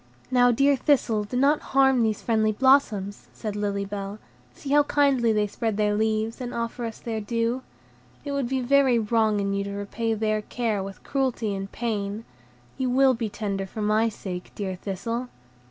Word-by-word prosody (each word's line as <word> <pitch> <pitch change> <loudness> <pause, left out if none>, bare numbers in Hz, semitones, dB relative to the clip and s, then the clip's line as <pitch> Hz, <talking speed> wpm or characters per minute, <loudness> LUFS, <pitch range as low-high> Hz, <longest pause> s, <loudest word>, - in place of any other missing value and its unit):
"Now, 245 -1 +5
dear 275 +4 +4
Thistle, 245 -6 +1
do 250 +4 -4
not 285 +3 +4 0.2
harm 265 -2 +5
these 220 -2 0
friendly 220 -2 +2
blossoms," 215 -5 +2
said 215 -2 -5
Lily 200 -1 -1
Bell; 200 0 -5 0.3
"see 275 - -8
how 295 +1 +6
kindly 280 -5 +2
they 210 -1 +2
spread 215 +1 -2
their 210 -1 +2
leaves, 220 +2 0
and 245 -1 -5
offer 235 +1 -3
us 225 - -5
their 225 -2 -4
dew. 230 +3 -1 0.6
It 285 - -3
would 280 -4 -1
be 265 -1 0
very 265 -1 +4
wrong 220 -1 +2
in 200 0 -1
you 200 0 -1
to 200 - -5
repay 220 +3 -2
their 215 0 0
care 220 -2 -2
with 195 0 -8
cruelty 255 -6 -1
and 195 0 -5
pain. 215 -2 -3 0.5
You 260 -1 0
will 265 +1 +4
be 230 -2 -3
tender 200 -2 -3
for 215 +3 -5
my 215 +2 +2
sake, 185 -4 -7
dear 195 -2 -3
Thistle." 230 +7 -4
225 Hz, 185 wpm, -25 LUFS, 205-250 Hz, 0.6 s, how